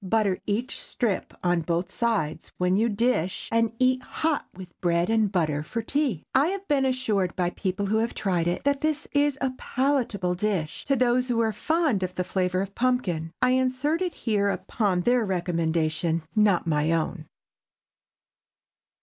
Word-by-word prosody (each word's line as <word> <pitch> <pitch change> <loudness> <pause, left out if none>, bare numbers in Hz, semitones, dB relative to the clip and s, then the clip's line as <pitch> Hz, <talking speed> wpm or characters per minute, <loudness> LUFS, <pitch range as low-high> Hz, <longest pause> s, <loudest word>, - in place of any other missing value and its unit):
Butter 200 -1 +1
each 230 +6 -2
strip 220 -6 -2
on 175 -1 +2
both 170 +3 -2
sides 190 -11 -1
when 180 +1 +2
you 225 +4 +2
dish, 205 -5 0
and 230 -1 +2
eat 255 +1 +3
hot 315 +3 -1
with 185 -1 -12
bread 175 +2 +1
and 220 -3 +2
butter 155 -6 0
for 225 +9 -4
tea. 265 - 0
I 270 +3 +4
have 395 +2 -4
been 280 -2 +2
assured, 215 -8 0
by 175 -1 0
people 195 +1 -2
who 215 +2 +1
have 230 +1 -1
tried 180 -4 0
it, 175 - -1
that 280 -1 +1
this 310 -1 -1
is 285 -1 +2
a 265 -1 +1
palatable 245 -9 0
dish 180 -5 -2
to 275 - +2
those 250 0 +2
who 240 -2 0
are 220 -1 +1
fond 310 - +1
of 185 0 -3
the 180 - 0
flavor 185 0 0
of 195 0 -5
pumpkin. 195 -11 0
I 250 - +4
insert 260 +6 +1
it 360 -2 -1
here 205 -3 +1
upon 200 -3 0
their 240 +4 +3
recommendation—not 170 +1 0
my 155 -1 +1
own. 160 -1 -2
205 Hz, 165 wpm, -26 LUFS, 180-255 Hz, -, I